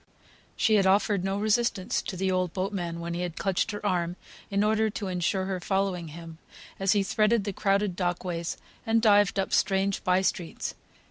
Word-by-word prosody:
She 220 -2 +3
had 195 -2 +3
offered 200 0 +3
no 195 +1 -1
resistance 215 -1 +1
to 190 - -6
the 190 +1 0
old 185 -2 0
boatman, 185 -3 -3
when 170 0 -4
he 175 - -3
had 175 -2 -4
clutched 195 +1 0
her 210 -1 -5
arm, 175 -3 0 0.3
in 200 0 +1
order 220 +1 +2
to 205 -1 -5
insure 185 +1 0
her 190 -1 -2
following 190 -2 -1
him, 165 +1 -10 0.4
as 195 0 +3
he 205 -2 +2
threaded 215 +2 +2
the 200 0 -3
crowded 195 -1 +1
dock 180 -1 -1
ways, 170 -2 -3 0.3
and 225 -1 +2
dived 205 -3 +4
up 195 - -1
strange 195 0 +1
bye 185 +1 +3
streets. 175 -3 -2
195 Hz, 190 wpm, -27 LUFS, 180-205 Hz, 0.4 s, dived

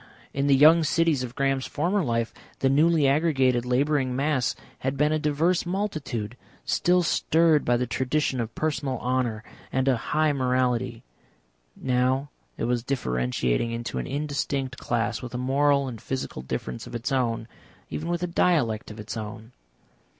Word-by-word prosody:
In 140 +1 0
the 140 - +6
young 160 +4 +7
cities 160 -2 +2
of 125 -1 -6
Graham's 135 -1 0
former 180 +6 0
life, 115 -3 -1 0.2
the 135 - +2
newly 155 +1 +4
aggregated 135 -5 +2
labouring 130 0 +1
mass 140 -2 +1 0.2
had 135 +1 -2
been 150 +2 +3
a 155 - +1
diverse 155 +4 +1
multitude, 155 - -3 0.3
still 180 0 +2
stirred 160 -2 +3
by 120 0 +2
the 125 - 0
tradition 130 +1 0
of 115 0 -5
personal 145 -4 -1
honour 120 -3 -1 0.3
and 130 0 0
a 130 -3 +4
high 155 +5 +1
morality; 125 -2 0 0.7
now 130 +2 0 0.3
it - - -3
was 120 0 +1
differentiating 65 - -1
into 115 0 -4
an - - -4
instinct 140 -2 -2
class, 120 -1 -1
with 125 -1 -7
a - - -1
moral 140 +2 +2
and 115 -4 -7
physical 130 - -4
difference 65 -1 -5
of - - -8
its 120 +3 -3
own 115 -4 0 0.4
even 165 +3 -4
with 175 0 -1
a - - +2
dialect 150 -11 +1
of 105 0 -10
its 105 +2 -6
own. 110 +1 -7
130 Hz, 160 wpm, -26 LUFS, 120-150 Hz, 0.7 s, young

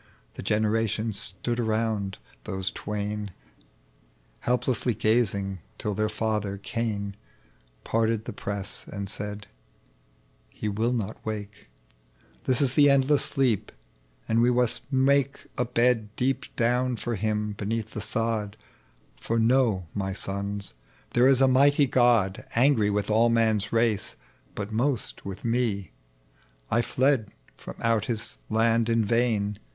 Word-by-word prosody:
Tbe - - -8
generations 110 0 0
stood 120 +6 0
around 110 -4 -1 0.3
those 95 0 -1
twain 105 0 -4 1.1
Helplessly 125 -1 0
gazing, 100 -4 +1 0.2
till 105 - -2
their 110 +2 0
father 105 -2 -2
Cain 100 -2 -3 0.7
Parted 115 -1 0
the - - -5
press, 100 -1 -3
and 100 0 -5
said, 105 +1 -4 0.4
' - - -36
' - - -37
He 110 - -5
will 110 +4 0
not 115 -6 -3
wake; 105 -2 -6 0.8
This 130 0 +3
is 135 -2 +2
the 145 -1 +6
endless 140 +1 +4
sleep, 130 -8 +1 0.6
and 115 +1 +3
we 120 - +4
must 125 +2 0
make 140 +1 +2
A 125 - 0
bed 115 -3 +1
deep 130 +2 0
down 125 +2 +1
for 120 +1 -3
bim 105 +1 -1
beneath 110 +2 -3
tbe 105 - -4
sod; 110 -2 -1 0.6
For 115 - -1
know, 115 -5 +3
my 95 -1 -2
sons, 100 -2 -3 0.4
there 120 +2 +4
is 135 -1 +4
a 135 - +6
mighty 140 +2 +5
God 120 -7 +3
Angry 115 -4 +4
with 105 +1 -1
all 115 +2 +4
man's 110 -3 +2
ra«o, 115 -2 +3 0.6
bat 100 +1 -4
most 120 +2 -1
with 100 +2 -7
me. 115 -6 0 0.8
I 120 - +4
fled 130 -3 +1 0.3
from - - -9
out 115 -2 +2
His 110 - -4
land 115 +1 +2
in 115 -1 +2
vain 105 -3 +1
110 Hz, 135 wpm, -26 LUFS, 105-120 Hz, 1.1 s, the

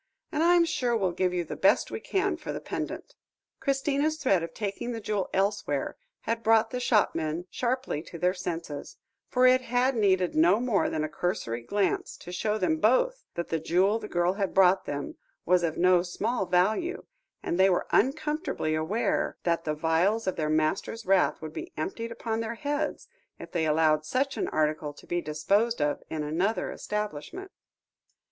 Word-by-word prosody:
And 305 - -1
I'm 345 0 +5
sure 255 -8 0
we'll 190 -4 +1
give 180 +1 0
you 180 -1 -1
the 160 - -6
best - - +3
we - - -4
can 390 -2 0
for 335 - -6
the - - -4
pendant." - - -5 0.5
Christina's 280 +3 0
threat 260 - +2
of 165 0 -5
taking 210 +6 -4
the 230 - -4
jewel 205 -2 -2
elsewhere, 195 -8 -1 0.3
had 230 0 -2
brought 225 0 +3
the 250 - -2
shopmen 170 -9 +1
sharply 255 - -1
to 170 - -10
their 180 +2 +2
senses, 170 -5 -5 0.3
for 255 0 +3
it 255 0 +6
had 250 +1 +1
needed 190 -5 +2
no 175 +7 +4
more 240 -5 +1
than 155 - -2
a - - 0
cursory 155 - -2
glance, 200 - -1
to 175 - -10
show 210 +4 -1
them 175 -6 +1
both 260 - +2
that 170 - -3
the 165 - 0
jewel 185 +7 +2
the 210 - -7
girl 175 0 +1
had 195 -1 -2
brought 190 0 +5
them 145 0 -5 0.3
was 180 +1 +4
of 165 -2 -1
no 180 0 +5
small 195 +4 -2
value, 220 - +1 0.4
and 175 - -2
they 190 +1 +6
were 180 - +1
uncomfortably 300 - 0
aware 160 +9 0
that 170 -1 0
the 155 -1 -1
vials 170 +8 +1
of 185 - -1
their 155 -2 -1
master's 155 +8 0
wrath 190 -3 +2
would 155 -1 -6
be - - -6
emptied 230 +9 -4
upon 225 -1 -3
their 230 +1 -3
heads, 290 +4 -3 0.3
if - - -10
they 165 -3 0
allowed 155 0 +3
such 265 - -1
an - - -1
article 150 -1 0
to - - -16
be 175 0 -1
disposed 200 +10 +1
of 145 0 0
in 155 -1 -3
another 175 +9 -1
establishment. 210 - -5
195 Hz, 180 wpm, -28 LUFS, 165-240 Hz, 0.5 s, it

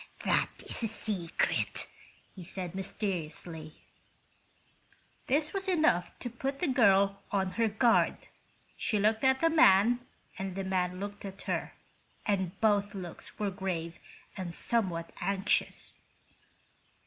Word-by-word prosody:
"That - - +2 0.2
is - - -6
a 225 - +1
secret," 200 -6 -1 0.5
he 185 - -8
said, 180 0 -5
mysteriously. 170 -5 -4 1.5
This 295 +3 +1
was 390 0 -1
enough 310 - +2
to 245 - -3
put 270 +4 -3
the 350 - 0
girl 200 -6 +4
on 190 -2 +1
her 225 +4 +2
guard. 225 +2 +3 0.6
She 215 - 0
looked 215 +3 +2
at 265 0 +4
the 330 - +5
man 240 -6 +6 0.4
and 190 -1 -3
the 195 - -2
man 185 -1 0
looked 205 +1 -6
at 195 0 -8
her, - - -2 0.5
and 190 -4 0
both 205 -1 +2
looks 180 -3 -7
were 205 -2 -1
grave 175 -3 -3 0.4
and 180 -4 -5
somewhat 180 -8 0
anxious. 200 0 0
200 Hz, 125 wpm, -31 LUFS, 185-225 Hz, 1.5 s, man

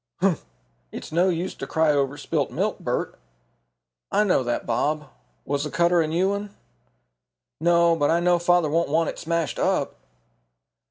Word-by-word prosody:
"Humph! 185 -3 +1 0.5
it's - - -8
no 175 +4 +3
use 180 +2 -2
to - - -7
cry 160 -2 +2
over 140 0 0
spilt - - -1
milk, - - -2
Bert." - - -3 0.9
"I 210 - +3
know 185 -9 +2
that, 120 -1 -2
Bob. 145 +6 -1 0.4
Was 140 0 -1
the 150 - -3
cutter 170 +1 +3
a 160 - 0
new 175 +5 +1
one?" 200 0 -4 1.0
"No, 170 +1 +4
but 145 -3 +1
I 170 - +3
know 175 0 +3
father 175 -1 +3
won't 170 0 +1
want 160 +2 +1
it - - -7
smashed 170 -2 -2
up." - - 0
170 Hz, 165 wpm, -24 LUFS, 150-175 Hz, 1.0 s, No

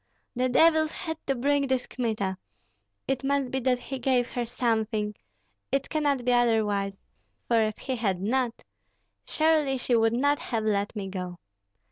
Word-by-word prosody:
the 255 +1 +1
devils 315 +3 +4
had 320 -2 -5
to 270 - +1
bring 280 +2 +1
this 260 -1 0
Kmita. 215 -6 -2 0.7
It 270 0 -1
must 275 -2 0
be 265 - 0
that 255 0 +2
he 260 +2 -6
gave 245 -1 +1
her 240 -1 -3
something, 220 -3 0 0.6
it 275 0 0
cannot 285 -5 0
be 250 - +3
otherwise; 210 -5 +2 0.5
for 230 -2 +3
if 215 -1 -1
he 260 -1 -3
had 195 -6 0
not, 235 +4 -1 0.6
surely 310 -4 +2
she 245 -1 +1
would 225 0 +3
not 285 +4 +2
have 225 -3 -2
let 205 0 0
me 200 -2 -4
go. 180 -2 -5
245 Hz, 160 wpm, -27 LUFS, 220-270 Hz, 0.7 s, devils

